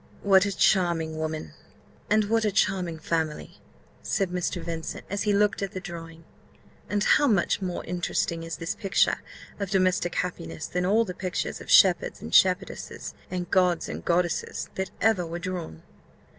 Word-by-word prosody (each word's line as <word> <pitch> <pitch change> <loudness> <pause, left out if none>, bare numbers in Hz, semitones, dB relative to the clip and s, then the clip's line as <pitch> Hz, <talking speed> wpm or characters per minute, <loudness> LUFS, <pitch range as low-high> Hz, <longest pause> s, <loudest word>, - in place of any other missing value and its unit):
"What 195 -1 +5
a 200 - -4
charming 165 -5 +2
woman, 155 - -4 0.6
and 215 0 +4
what 225 +2 +1
a 210 - +1
charming 180 -3 0
family!" 160 -1 -3 0.4
said 195 -4 -1
Mr. 180 0 -2
Vincent, 165 -1 -5
as 200 - -1
he - - +5
looked 205 0 +2
at 195 - -3
the 185 - -4
drawing; 165 -2 -9 0.7
"and 205 0 +1
how 290 - +4
much 200 -4 +2
more 180 -2 -3
interesting 170 -1 -1
is 165 0 -5
this 165 +2 -3
picture 195 -2 +1 0.4
of 200 -2 -3
domestic 185 -3 +1
happiness 80 - -3
than 180 0 -1
all 220 +4 +3
the 180 - -5
pictures 185 0 -3
of - - -11
shepherds - - +5
and 80 - -8
shepherdesses, 190 +1 +2 0.2
and 180 -1 -4
gods 180 -3 +2
and - - -6
goddesses, 175 -1 -1
that 190 -1 -3
ever 220 -4 +3
were 170 0 -5
drawn!" 175 - -5
180 Hz, 165 wpm, -26 LUFS, 165-195 Hz, 0.7 s, What